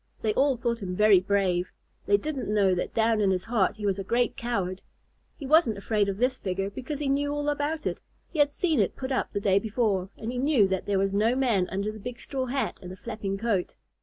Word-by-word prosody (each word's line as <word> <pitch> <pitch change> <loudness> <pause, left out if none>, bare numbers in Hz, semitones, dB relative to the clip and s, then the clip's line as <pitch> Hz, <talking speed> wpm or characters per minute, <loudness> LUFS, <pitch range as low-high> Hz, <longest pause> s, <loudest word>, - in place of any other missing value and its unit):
They 215 -1 +1
all 275 +2 +3
thought 235 -1 -2
him 180 -2 -4
very 210 -1 +6
brave. 185 -2 0 0.4
They 405 - +5
didn't 300 - -4
know 200 -3 +3
that 180 - -3
down 225 -1 +2
in 200 - +3
his 185 -1 0
heart 225 -5 +1
he 210 - -5
was 200 -1 0
a - - -3
great 240 +5 +1
coward. 195 -6 -2 0.6
He 285 - -7
wasn't 285 -7 +4
afraid 205 0 0
of 195 - -3
this 255 +3 +1
figure 195 +1 -2
because 265 +7 -5
he 290 0 -3
knew 285 +1 +1
all 290 0 -1
about 295 +2 -2
it. - - -2 0.3
He 320 - -4
had 290 0 +4
seen 315 -2 +1
it 200 - +1
put 260 0 -5
up 260 - -1
the 200 - -2
day 200 -1 +3
before, 205 -3 0
and 225 +1 -4
he 250 - -3
knew 265 -7 +4
that 190 -1 -2
there 200 -1 +1
was 195 0 +1
no 220 +4 +2
man 230 -9 +1
under 200 +3 -2
the 215 - -10
big 245 +3 -7
straw 260 -2 -3
hat 270 +2 -2
and 180 - -8
the - - -7
flapping 205 -2 -4
coat. 205 -4 -1
220 Hz, 245 wpm, -27 LUFS, 195-260 Hz, 0.6 s, very